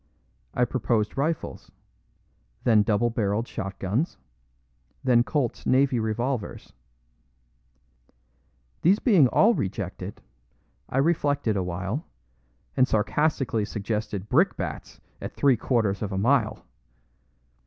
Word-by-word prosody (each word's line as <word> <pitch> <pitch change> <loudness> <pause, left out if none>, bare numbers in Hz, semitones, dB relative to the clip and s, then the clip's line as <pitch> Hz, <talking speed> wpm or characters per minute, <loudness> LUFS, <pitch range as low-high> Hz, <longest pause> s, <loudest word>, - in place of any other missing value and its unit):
I 125 - +3
proposed 115 -3 0
rifles; 155 +4 -2 0.9
then 110 -3 +5
double 115 +2 +1
barreled 110 +1 -1
shotguns; 100 - -3 0.9
then 120 -2 +4
Colt's 135 -2 -2
navy 130 -1 +3
revolvers. 115 +2 -3 2.1
These 185 +5 +5
being 195 - +5
all 220 - +4
rejected, 95 - -4 0.7
I - - -3
reflected 145 -6 +1
awhile, 95 - -2 0.7
and 130 -1 +4
sarcastically 115 +1 +1
suggested 105 -1 -3
brickbats - - 0 0.2
at - - -6
three 140 -3 +4
quarters 110 -4 0
of 105 -2 -3
a 95 - -2
mile. 115 +1 +1
115 Hz, 95 wpm, -26 LUFS, 105-135 Hz, 2.1 s, then